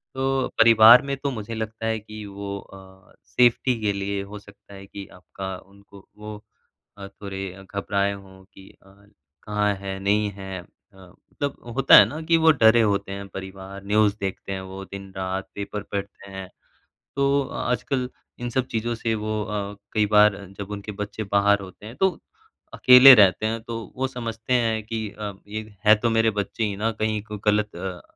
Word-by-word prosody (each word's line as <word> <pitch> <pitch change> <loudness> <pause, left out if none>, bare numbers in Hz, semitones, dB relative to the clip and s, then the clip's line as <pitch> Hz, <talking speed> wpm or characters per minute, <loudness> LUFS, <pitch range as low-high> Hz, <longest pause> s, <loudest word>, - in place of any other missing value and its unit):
तो 135 0 0
परिवार 115 +1 +8
में 140 - -2
तो 140 0 -3
मुझे 115 -1 -6
लगता 110 0 -5
है 110 -1 0
कि 110 0 -10
वो 100 0 -6
अ, 95 0 -16
सेफ्टी 125 0 +2
के 105 -1 0
लिए 100 0 -3
हो 105 +1 -9
सकता 100 0 -18
है 100 0 -11
कि 100 0 -10
आपका 95 +1 -7
उनको 100 +1 -18
वो 105 0 -8 0.6
अ, 100 -1 -8
थोड़े 95 -1 -8
घबराएँ 100 0 0
हों 95 -1 -13
कि 95 0 -15 0.2
अ, - - -19 0.5
कहाँ 105 -1 0
है, 95 0 -6
नहीं 105 +1 +1
है 95 -1 -7
अ, - - -18 0.3
मतलब 95 +9 -7 0.2
होता 135 0 +6
है - - +9
ना 155 +2 -6
कि 165 +1 +2
वो 160 0 +5
डरे 115 -4 +5
होते 100 -2 0
हैं 100 0 -6
परिवार 95 +1 -9
न्यूज़ 105 0 +2
देखते 95 0 -5
हैं 95 - -4
वो 95 +1 -8
दिन-रात 95 -1 -6
पेपर 100 0 -5
पढ़ते 100 0 -6
हैं। 95 -1 -8 0.7
तो 140 0 +2 0.2
आजकल 125 +1 -1 0.3
इन 120 - -3
सब 130 +1 -1
चीज़ों 120 0 -2
से 115 0 -2
वो 110 0 -2
अ, 105 -1 -4 0.2
कई 105 -1 +2
बार 105 0 +5 0.2
जब 100 0 -7
उनके 105 +1 -6
बच्चे 105 +1 -5
बाहर 100 0 +4
होते 95 +2 -11
हैं 115 - -10
तो 190 +5 +3 0.6
अकेले 130 +1 +9
रहते 100 -2 +4
हैं 115 +1 -2
तो 115 0 -6 0.2
वो 130 +1 0
समझते 115 -2 -5
हैं 115 -2 +1
कि 110 -1 -4
अ, 105 0 -6 0.2
ये 110 0 -7
है 105 - +9
तो 115 +2 0
मेरे 115 0 +3
बच्चे 100 +3 -2
ही 100 -2 -2
ना 110 +3 0
कहीं 110 0 -2
को 105 -2 -7
गलत 105 -2 +1
अ, 90 0 -6
105 Hz, 185 wpm, -24 LUFS, 100-115 Hz, 0.7 s, है